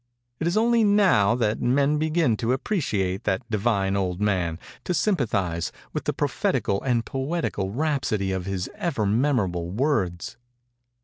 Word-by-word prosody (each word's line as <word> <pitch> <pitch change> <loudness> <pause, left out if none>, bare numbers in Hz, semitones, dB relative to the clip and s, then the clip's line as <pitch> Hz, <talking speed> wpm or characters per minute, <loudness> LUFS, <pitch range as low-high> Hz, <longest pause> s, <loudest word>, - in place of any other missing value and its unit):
It 160 - -1
is 175 - +1
only 230 +1 +3
now 190 - +4
that 115 -3 0
men 140 +4 +2
begin 155 -6 +2
to 115 +3 0
appreciate 105 - -1
that 95 - -1
divine 100 -3 +1
old 90 -2 -1
man—to 95 - -2
sympathize 105 - 0 0.2
with - - -3
the - - +1
prophetical 100 0 0
and 120 -3 0
poetical 135 - -2
rhapsody 120 -6 -1
of 95 -1 -3
his 95 -2 -2
ever 140 -12 -2
memorable 100 -7 +1
words. 115 - -1
115 Hz, 135 wpm, -25 LUFS, 95-150 Hz, 0.2 s, now